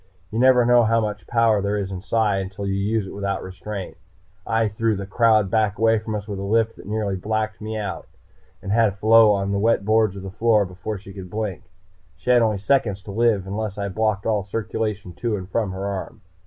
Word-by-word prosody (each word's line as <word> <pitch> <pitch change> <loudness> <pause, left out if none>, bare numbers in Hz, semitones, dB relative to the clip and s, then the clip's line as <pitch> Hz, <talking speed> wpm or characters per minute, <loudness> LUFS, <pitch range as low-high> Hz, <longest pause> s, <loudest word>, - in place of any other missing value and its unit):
You 110 - -2
never 125 -1 +5
know 120 0 +6
how 115 +1 +3
much 105 -2 -4
power 115 -3 +3
there 100 +1 -1
is 100 -1 -3
in 95 -1 -5
Psi 105 -1 +1
until 95 +1 -5
you 100 - -1
use 100 +2 0
it - - -8
without 100 -1 -3
restraint. 95 +1 -7 0.5
I 115 0 +2
threw 110 +1 0
the 100 0 -5
crowd 110 -1 +3
back 110 -2 +1
away 115 0 +3
from 110 0 -5
us 105 0 -5
with 100 -2 -5
a - - -4
lift 110 +3 +1
that - - -12
nearly 105 -2 -1
blacked 110 +3 -2
me 110 +1 -4
out, 100 -5 -5 0.6
and 100 - -4
had 110 -3 +2
Pheola 110 -1 +5
on 100 - -2
the 100 - 0
wet 110 -1 +2
boards 110 -2 +3
of 95 - -8
the 95 - -6
floor 110 0 +3
before 95 +4 -6
she 95 0 -12
could 95 -2 -9
blink. 105 -2 -4 0.5
She 90 +8 -1
had 120 -1 +6
only 110 -2 +2
seconds 100 -2 0
to 100 - -8
live 110 -2 +2
unless 100 +1 -4
I 100 -1 -2
blocked 110 0 -1
all 110 -2 +1
circulation 105 -1 -3
to 110 +5 -2
and 95 -3 -6
from 105 0 -1
her 95 +1 -5
arm. 100 -2 -5
105 Hz, 225 wpm, -23 LUFS, 100-110 Hz, 0.6 s, know